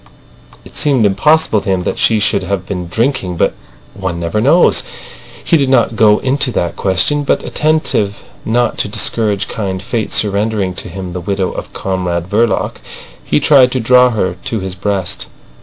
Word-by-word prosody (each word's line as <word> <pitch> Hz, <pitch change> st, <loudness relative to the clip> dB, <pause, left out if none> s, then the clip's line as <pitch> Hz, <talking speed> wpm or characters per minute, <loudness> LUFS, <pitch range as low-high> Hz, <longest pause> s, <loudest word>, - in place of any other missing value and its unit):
It -, -, -15 dB
seemed 135 Hz, -7 st, +2 dB
impossible 110 Hz, +2 st, +3 dB
to 100 Hz, -, -5 dB
him 95 Hz, -2 st, 0 dB
that -, -, -3 dB
she 110 Hz, -1 st, +3 dB
should 100 Hz, -1 st, +1 dB
have 95 Hz, -2 st, -3 dB
been 90 Hz, -3 st, -5 dB
drinking. 95 Hz, -, -1 dB
But -, -, +1 dB, 0.4 s
one 90 Hz, -3 st, -4 dB
never 85 Hz, +5 st, -1 dB
knows. 150 Hz, +9 st, +4 dB, 0.6 s
He 170 Hz, -, +3 dB
did 140 Hz, -3 st, +1 dB
not 120 Hz, -3 st, +2 dB
go 105 Hz, -1 st, +5 dB
into 135 Hz, 0 st, 0 dB
that 85 Hz, -, -1 dB
question, 125 Hz, +10 st, 0 dB
but -, -, 0 dB
attentive 150 Hz, -10 st, 0 dB, 0.2 s
not 120 Hz, +1 st, 0 dB
to -, -, +1 dB
discourage 105 Hz, -1 st, 0 dB
kind 95 Hz, -3 st, -4 dB
fate 110 Hz, +3 st, -3 dB
surrendering 100 Hz, -2 st, 0 dB
to 90 Hz, -, -4 dB
him 90 Hz, 0 st, -7 dB
the 90 Hz, -, -5 dB
widow 95 Hz, +1 st, -2 dB
of -, -, -7 dB
Comrade 90 Hz, -2 st, -2 dB
Verloc, 110 Hz, +3 st, 0 dB, 0.5 s
he 75 Hz, -, +1 dB
tried 130 Hz, -4 st, +5 dB
to 130 Hz, -, 0 dB
draw 125 Hz, +2 st, +5 dB
her 95 Hz, -6 st, -1 dB
to 115 Hz, -, -2 dB
his 95 Hz, -1 st, -5 dB
breast. 95 Hz, -1 st, -3 dB
105 Hz, 175 wpm, -14 LUFS, 95-120 Hz, 0.6 s, go